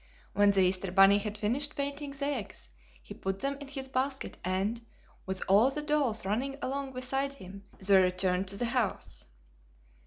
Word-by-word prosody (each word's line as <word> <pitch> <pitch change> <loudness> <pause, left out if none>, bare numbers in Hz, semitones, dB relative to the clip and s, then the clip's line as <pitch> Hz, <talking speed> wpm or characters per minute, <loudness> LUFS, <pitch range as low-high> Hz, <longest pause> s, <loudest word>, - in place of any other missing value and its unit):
When 205 0 +4
the 195 -1 +3
Easter 185 0 +1
bunny 195 +2 +6
had 210 0 -5
finished 255 +8 0
painting 285 +1 -3
the 280 0 -4
eggs 220 - -4 0.3
he - - -9
put 195 0 -3
them 275 +5 -2
in 285 - -8
his 270 -1 -6
basket 265 +1 -2
and, 195 +6 -1 0.4
with 190 0 -3
all 205 +7 +5
the 295 +2 -2
dolls 285 -9 +1
running 255 +8 -1
along 275 0 -4
beside 270 +2 -1
him, 200 -5 -12
they 195 0 +5
returned 185 +1 +1
to 200 +1 0
the 240 - 0
house. 235 -4 -2
225 Hz, 175 wpm, -30 LUFS, 195-275 Hz, 0.4 s, bunny